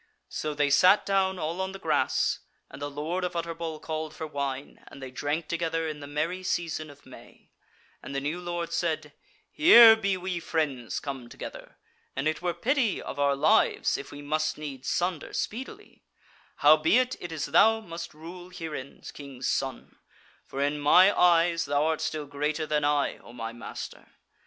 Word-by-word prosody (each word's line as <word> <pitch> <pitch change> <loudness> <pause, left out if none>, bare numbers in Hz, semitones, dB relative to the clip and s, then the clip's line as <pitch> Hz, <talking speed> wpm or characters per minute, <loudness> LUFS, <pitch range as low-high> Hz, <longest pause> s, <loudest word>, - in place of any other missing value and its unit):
So 155 -1 -3
they 145 -1 +1
sat 185 +8 +6
down 190 -1 +1
all 170 +2 -3
on 190 0 -3
the - - -6
grass, - - +1 0.3
and 135 - -11
the 145 - -3
Lord 155 +6 -3
of 180 -1 -3
Utterbol 165 -1 -4
called 155 -1 -5
for 160 - -5
wine, 140 -2 -5
and - - -12
they 130 -1 -8
drank 145 +5 -2
together 165 -1 -1
in 155 -1 -5
the 145 - -8
merry 155 +6 -2
season 165 -4 -2
of 145 0 -16
May; - - -16 0.5
and 140 - -8
the - - +1
new 150 +5 -3
Lord 175 -1 -4
said: 165 -3 -1 0.4
"Here 235 -8 +9
be 200 -3 0
we 180 -1 -3
friends 150 -8 -2
come 135 -4 -6
together, - - -9 0.4
and 135 +3 -1
it 155 0 -1
were 175 -1 -1
pity 240 - +1
of - - -7
our 140 -1 +3
lives 150 +3 +3
if 140 - -6
we 145 0 -9
must 155 +1 -1
needs 140 -4 -6
sunder 175 -3 -1
speedily: 265 - -6 0.6
howbeit, 160 - +5
it 175 - -7
is 155 -3 -3
thou 215 +9 +5
must 170 -7 -8
rule 175 +3 -10
herein, 160 -6 -7
King's 135 -3 -6
Son; 135 -1 -3 0.5
for 135 +1 -2
in 145 +1 0
my 180 +7 +6
eyes 170 -1 +4
thou 145 +1 +1
art 160 0 0
still 155 -2 -2
greater 150 +2 -2
than 150 -1 0
I, 145 -1 +1
O 120 - -15
my 115 -1 -5
master. 120 - -8
155 Hz, 175 wpm, -27 LUFS, 145-175 Hz, 0.6 s, Here